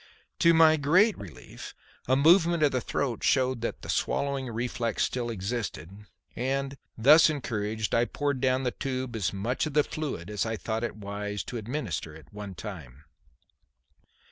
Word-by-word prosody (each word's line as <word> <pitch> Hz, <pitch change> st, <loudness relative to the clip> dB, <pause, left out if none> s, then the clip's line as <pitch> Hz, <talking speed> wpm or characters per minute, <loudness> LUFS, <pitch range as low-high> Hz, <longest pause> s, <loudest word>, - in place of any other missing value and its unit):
To 170 Hz, -, +6 dB
my 160 Hz, -1 st, +6 dB
great 185 Hz, +10 st, +4 dB
relief 95 Hz, -6 st, -10 dB, 0.3 s
a 130 Hz, -, +4 dB
movement 165 Hz, +3 st, +4 dB
of 145 Hz, -, +4 dB
the 130 Hz, -, 0 dB
throat 125 Hz, -4 st, -2 dB
showed 130 Hz, -2 st, +2 dB
that 115 Hz, -, -4 dB
the -, -, -8 dB
swallowing 140 Hz, -2 st, -1 dB
reflex 115 Hz, -1 st, -2 dB
still 120 Hz, -2 st, -2 dB
existed, 105 Hz, -4 st, -4 dB, 0.4 s
and, 135 Hz, +2 st, -2 dB, 0.2 s
thus 150 Hz, +8 st, +7 dB
encouraged, 110 Hz, -6 st, -3 dB
I 115 Hz, +1 st, +3 dB
poured 140 Hz, 0 st, -2 dB
down 130 Hz, 0 st, +2 dB
the 125 Hz, -, 0 dB
tube 130 Hz, -2 st, -4 dB
as 100 Hz, -6 st, -1 dB
much 115 Hz, +9 st, -2 dB
of 150 Hz, -, -6 dB
the 150 Hz, -, +5 dB
fluid 140 Hz, -, -5 dB
as 105 Hz, -, -1 dB
I 110 Hz, -1 st, -2 dB
thought 110 Hz, +2 st, -3 dB
it 120 Hz, -, -3 dB
wise 105 Hz, -1 st, -5 dB
to 120 Hz, -, -6 dB
administer 105 Hz, -, -4 dB
at 80 Hz, +5 st, -16 dB
one 100 Hz, -2 st, -7 dB
time. 80 Hz, -, -9 dB
120 Hz, 165 wpm, -28 LUFS, 105-140 Hz, 0.4 s, thus